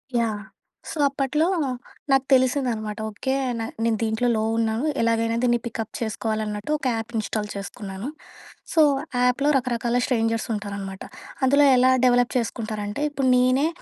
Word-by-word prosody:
Yeah! 220 -3 0 0.5
So, - - -6
అప్పట్లో 275 +3 0 0.7
నాకు 270 0 +4
తెలిసిందనమాట. 250 -5 +1
Okay, 265 +5 -3 0.3
న - - -2 0.2
నేను 230 -1 +2
దీంట్లో 220 +2 0
లో 215 - 0
ఉన్నాను, 225 +2 0 0.2
ఎలాగైనా 230 0 +1
దీన్ని 240 -1 +3
పికప్ 225 -2 -4
చేసుకోవాలన్నట్టు, 215 +2 -3
ఒక 280 - -9
యాప్ 225 +1 -5
ఇన్స్టాల్ 210 0 -2
చేసుకున్నాను. 200 +1 -6 0.7
సో, 320 - +5 0.4
యాప్‍లో 265 +4 +2
రకరకాల 245 -1 0
స్ట్రేంజర్సుంటారనమాట. 210 -5 -2 0.4
అందులో 280 +2 +5
ఎలా 255 +1 +5
డవలప్ 245 0 +4
చేసుకుంటారంటే, 220 -1 -3
ఇప్పుడు 275 -2 0
నేనే 255 +4 +3
230 Hz, 125 wpm, -24 LUFS, 215-255 Hz, 0.7 s, సో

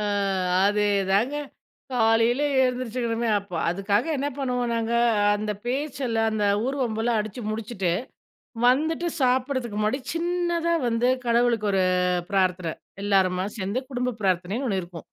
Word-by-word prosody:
ஆ, - - -1 0.6
அதேதாங்க. 205 +4 +2 0.6
காலையில 230 +2 +3 0.2
எழுந்திரிச்சுக்கணுமே 240 -2 -1
அப்போ, 200 -2 -10
அதுக்காக 200 - 0
என்ன 280 +1 -1
பண்ணுவோம் 250 -3 -1
நாங்க, 230 0 -1 0.4
அந்த 210 0 -2
பேச்செல்லாம், 250 -4 -1
அந்த 210 -1 0 0.2
ஊர்வம்பெல்லாம் 240 -4 0
அடிச்சு 215 +3 -6
முடிச்சுட்டு 215 -5 -2 0.8
வந்துட்டு 315 +6 +2
சாப்பிடறதுக்கு 255 -3 0
முன்னாடி 215 +6 0
சின்னதா 340 0 0
வந்து 230 +1 +1 0.2
கடவுளுக்கு 235 -2 +2
ஒரு 190 - +3 0.5
பிரார்த்தன, 185 -4 +1 0.3
எல்லாருமா 190 -2 +2 0.2
சேர்ந்து 200 +7 -2
குடும்ப 250 -2 -2
பிரார்த்தனைன்னு 190 +8 0
ஒண்ணு 190 -3 0
இருக்கும். 170 -2 -10
230 Hz, 115 wpm, -25 LUFS, 205-255 Hz, 0.8 s, காலையில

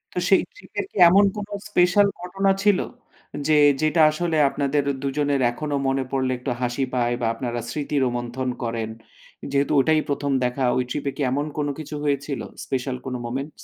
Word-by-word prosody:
তো - - +1
সেই - - +6
ট্রিপ - - -17
এর - - -1
কি - - -11
এমন 200 +3 +6
কোনো 205 0 -6 0.2
স্পেশাল 190 +2 +4
ঘটনা 195 +2 +1
ছিল? 205 -3 +4 0.7
যে, 155 - +3 0.3
যেটা 155 +1 +3
আসলে 160 0 -1
আপনাদের 140 +1 0 0.2
দুজনের 140 0 0
এখনো 145 +3 -3
মনে 135 0 +1
পড়লে 130 -1 0
একটু 125 - -4
হাসি 125 +2 -1
পায়? 120 -1 +1
বা - - 0
আপনারা 120 0 -4
স্মৃতি 150 0 -3
রোমন্থন 120 +1 -2
করেন? 115 -1 -2 0.6
যেহেতু 140 +1 +1
ওটাই 155 +3 +3
১ম 140 0 -1
দেখা 125 +2 -1
ওই 125 - +2
ট্রিপ 145 +3 -4
এ - - -3
কি - - -4
এমন 145 +2 0
কোন 145 -1 0
কিছু 155 -1 -6
হয়েছিল? 140 -1 -1 0.3
স্পেশাল 130 -1 -2
কোনো 125 -1 -3
মোমেন্টস? 135 +5 -4
140 Hz, 180 wpm, -23 LUFS, 125-155 Hz, 0.7 s, সেই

